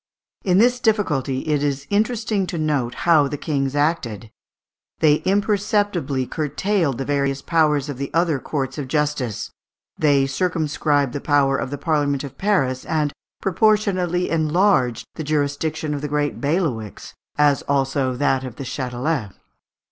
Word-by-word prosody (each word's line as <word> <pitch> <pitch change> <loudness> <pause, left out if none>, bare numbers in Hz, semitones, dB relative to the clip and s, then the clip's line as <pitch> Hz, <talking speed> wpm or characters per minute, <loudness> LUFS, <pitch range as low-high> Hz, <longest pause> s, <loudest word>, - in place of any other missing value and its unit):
In 180 -2 +3
this 245 +4 +4
difficulty 150 - 0
it 150 -2 0
is 140 -1 -1
interesting 215 -2 0
to 175 - -4
note 145 -6 -1
how 160 -4 +5
the 145 - -4
kings 140 -2 -2
acted. 120 -8 -1 0.7
They 150 -2 +4
imperceptibly 200 - +1
curtailed 155 - -1
the 135 - -3
various 140 -1 -1
powers 150 -4 +2
of 140 -3 -6
the 140 - -3
other 165 -3 +1
courts 135 0 -3
of 140 - -4
justice, 145 -5 -1 0.5
they 140 -3 +4
circumscribed 145 -3 0
the 145 - -4
power 140 -2 +3
of 135 - -2
the 145 - -4
Parliament 145 -4 0
of 140 - -8
Paris, 135 -11 +1
and 150 -3 -1 0.3
proportionately 190 -3 +1
enlarged 155 - +2
the 160 - -5
jurisdiction 150 +1 -1
of 145 - -3
the 150 - -2
great 145 0 -1
bailiwicks, 140 - -2 0.2
as 145 -2 +3
also 135 -2 0
that 135 0 +1
of 125 -3 -7
the 135 - -6
Châtelet. 125 -2 -3
145 Hz, 145 wpm, -21 LUFS, 135-170 Hz, 0.7 s, how